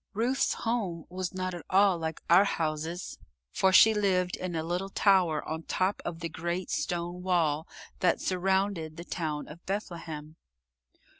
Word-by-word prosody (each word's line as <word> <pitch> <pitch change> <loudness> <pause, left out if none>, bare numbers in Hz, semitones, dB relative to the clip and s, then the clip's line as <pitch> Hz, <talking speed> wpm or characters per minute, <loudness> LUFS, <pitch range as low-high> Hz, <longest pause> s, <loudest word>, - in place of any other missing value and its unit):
Ruth's 245 +5 +1
home 205 -8 -2
was 185 0 -3
not 185 -1 -3
at 175 - -7
all 190 -2 +4
like 160 -1 -4
our 175 +4 +7
houses, 160 0 -3 0.3
for 190 - +3
she 220 +3 +8
lived 185 -4 +1
in 180 -2 -4
a 160 - -1
little 180 +4 -2
tower 185 -6 +3
on 160 +1 -3
top 185 +4 -1
of 170 -1 -5
the 165 - -1
great 170 +3 -3
stone 175 +1 -2
wall 165 -4 +1 0.3
that 180 - +2
surrounded 190 -3 0
the 170 - -7
town 155 -5 -3
of 170 +3 -12
Bethlehem. 165 -6 -5
175 Hz, 155 wpm, -29 LUFS, 165-190 Hz, 0.3 s, she